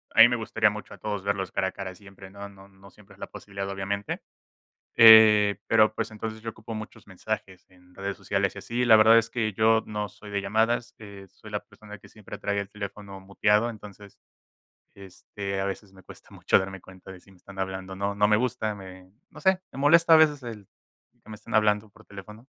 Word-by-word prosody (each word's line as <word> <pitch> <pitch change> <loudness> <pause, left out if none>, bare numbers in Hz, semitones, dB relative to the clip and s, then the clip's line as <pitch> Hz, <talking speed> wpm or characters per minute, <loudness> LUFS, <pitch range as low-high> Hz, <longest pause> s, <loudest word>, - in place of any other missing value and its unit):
a - - +7
mí - - +9
me 120 - -1
gustaría 110 -1 +1
mucho 105 +1 -9
a - - -12
todos 105 -2 -4
verlos 100 -2 -2
cara 95 -1 -1
a 95 - -4
cara 95 -2 -7
siempre, 95 -1 -14
¿no?, 100 0 -9
no 100 0 -17
no 95 0 -18
siempre 100 -2 -19
es 100 - -26
la - - -7
posibilidad 100 -1 -7
obviamente, 100 +1 -4 0.7
eh, 105 -3 +7
pero, 110 -1 +4
pues, - - -3
entonces, 110 0 -7
yo 115 - -5
ocupo 110 +1 -9
muchos 110 0 -9
mensajes 95 -1 -6
en 90 0 -23
redes 100 +1 -5
sociales 100 -1 -2
y - - -10
así, 120 +5 -2
la 115 -2 +7
verdad 110 +1 +7
es 115 - -5
que 115 -3 -2
yo 110 +2 +3
no 105 -1 -4
soy 105 -1 -14
de 100 - -2
llamadas, 110 +4 0
eh, 100 -2 -12
soy 105 - -15
la 105 - -2
persona 105 0 -14
que - - -17
siempre 110 -3 -11
trae 100 0 -2
el 100 -1 -5
teléfono 100 -1 -8
muteado 105 +4 +1
entonces, 105 -2 -12 0.8
este, 100 0 -7
a 95 - -2
veces 100 0 -6
me 95 -1 -17
cuesta - - -16
mucho - - +2
darme 95 0 -6
cuenta 95 +1 -14
de 90 - -13
si 100 - -22
me 95 - -20
están 95 +2 -15
hablando 95 0 -5
o 95 - -8
no, 100 +1 -2
no 105 +1 +2
me 105 - +4
gusta, 110 -3 -2
me 95 -1 -13 0.2
no - - -14
sé, 190 -1 +3
me - - -11
molesta 165 +4 +5
a - - +9
veces 150 -3 +3
el 110 -5 -9 0.6
que - - -22
me 110 - -8
están - - -11
hablando 105 0 +2
por - - -21
teléfono. 105 +4 -12
105 Hz, 225 wpm, -26 LUFS, 95-110 Hz, 0.8 s, mí